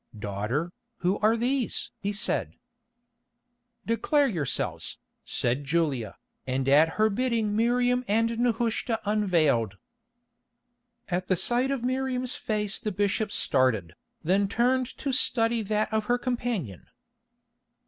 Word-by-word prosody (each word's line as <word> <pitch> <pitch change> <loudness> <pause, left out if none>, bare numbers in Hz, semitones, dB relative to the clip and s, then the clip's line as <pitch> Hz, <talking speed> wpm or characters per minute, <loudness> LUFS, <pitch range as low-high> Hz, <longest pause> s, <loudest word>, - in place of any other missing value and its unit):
"Daughter, 105 - -2 0.3
who 180 +3 +1
are 220 +2 +3
these?" 250 +1 -1
he 200 - -2
said. 205 - -1 1.3
"Declare 280 +5 +2
yourselves," 160 - -2 0.3
said 125 +4 0
Julia, 135 -9 -1 0.3
and 130 +1 -1
at 150 +4 +5
her 215 0 +4
bidding 225 -1 0
Miriam 245 +2 +2
and 230 +2 +1
Nehushta 235 -1 0
unveiled. 160 - +1 1.3
At 180 0 -1
the 185 - +3
sight 240 +8 +1
of 275 -3 -2
Miriam's 255 0 -1
face 210 -2 -2
the 215 - -3
bishop 205 +2 0
started, 125 - +1 0.3
then 195 +4 +2
turned 250 +4 +1
to 280 - -2
study 230 -2 +3
that 215 +1 -1
of 220 -1 0
her 245 +3 +2
companion. 240 - -3
215 Hz, 115 wpm, -27 LUFS, 160-240 Hz, 1.3 s, at